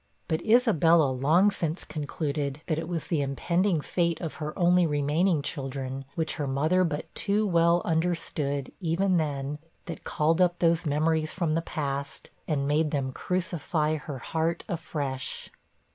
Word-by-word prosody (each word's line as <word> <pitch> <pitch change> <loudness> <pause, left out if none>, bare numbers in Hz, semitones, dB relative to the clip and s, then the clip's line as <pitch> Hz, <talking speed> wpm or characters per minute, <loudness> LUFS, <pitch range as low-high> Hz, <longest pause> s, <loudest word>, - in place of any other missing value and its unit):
But 160 +1 0
Isabella 170 - +4
long 155 +10 +4
since 165 -3 -2
concluded 145 -1 -3
that 160 -2 -1
it - - -5
was 170 -3 -3
the 160 -4 0
impending 170 +5 +1
fate 170 +1 0
of 165 - -4
her 150 0 -4
only 180 -1 +4
remaining 150 +3 +1
children, 135 -2 -4
which 160 -2 -2
her 145 - -2
mother 155 +7 +2
but 150 -3 -3
too 210 +1 +1
well 170 -2 +3
understood, 160 -4 -1
even 180 +1 +1
then, 145 -2 -2 0.3
that 170 - -7
called 160 +3 +1
up 175 -1 +3
those 170 -1 +2
memories 155 +1 +1
from 170 -4 0
the 165 - +1
past, 140 -3 -4 0.2
and 140 -3 0
made 150 +2 +2
them 135 -3 -1
crucify 160 -2 -1
her 145 -2 -6
heart 160 +6 -2
afresh. 140 -5 -4
160 Hz, 150 wpm, -27 LUFS, 145-170 Hz, 0.3 s, Isabella